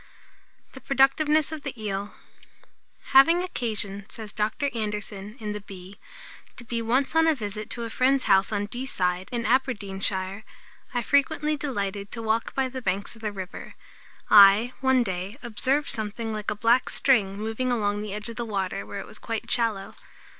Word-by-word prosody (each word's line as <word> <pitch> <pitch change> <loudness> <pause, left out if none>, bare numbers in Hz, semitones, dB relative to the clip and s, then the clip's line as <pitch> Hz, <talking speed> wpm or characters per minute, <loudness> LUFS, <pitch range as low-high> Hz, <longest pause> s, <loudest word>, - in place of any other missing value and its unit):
THE 265 - -11
PRODUCTIVENESS 290 +4 +3
OF 315 -1 -5
THE 275 -4 -6
EEL. 205 -1 -4 1.0
"Having 330 +7 +7
occasion," 210 - -3
says 215 -3 -8
Dr. 245 +7 -1
Anderson, 210 -1 -4
in 210 -2 -4
the 210 0 -5
Bee, 190 0 -11 0.6
"to 245 - -8
be 230 0 -3
once 255 +7 +1
on 325 0 +5
a 320 - +4
visit 210 -3 -5
to 235 - -4
a 230 - -4
friend's 265 +2 +2
house 195 0 +4
on 205 -1 -1
Dee 245 +5 -5
side, 180 -4 -1
in 235 -1 -2
Aberdeenshire, 200 -5 -1 0.5
I 245 -1 -1
frequently 290 +4 +2
delighted 200 -9 -3
to 230 - -5
walk 225 +1 -1
by 265 -1 +1
the 260 0 -6
banks 200 +1 -2
of 225 - -16
the 215 -1 -2
river. 190 -2 -8 0.5
I, 205 +4 +7
one 260 -2 +4
day, 190 +2 -4
observed 265 +5 0
something 220 +1 -3
like 215 -1 -3
a - - -2
black 230 +4 +3
string 205 -8 +3
moving 225 +4 -2
along 205 -3 0
the 210 -1 -5
edge 210 +2 -3
of 230 - -7
the 240 - -2
water 195 -3 -3
where 200 - -6
it - - -9
was 215 - -12
quite 225 -2 -4
shallow. 220 -5 0
220 Hz, 175 wpm, -26 LUFS, 200-255 Hz, 1.0 s, Having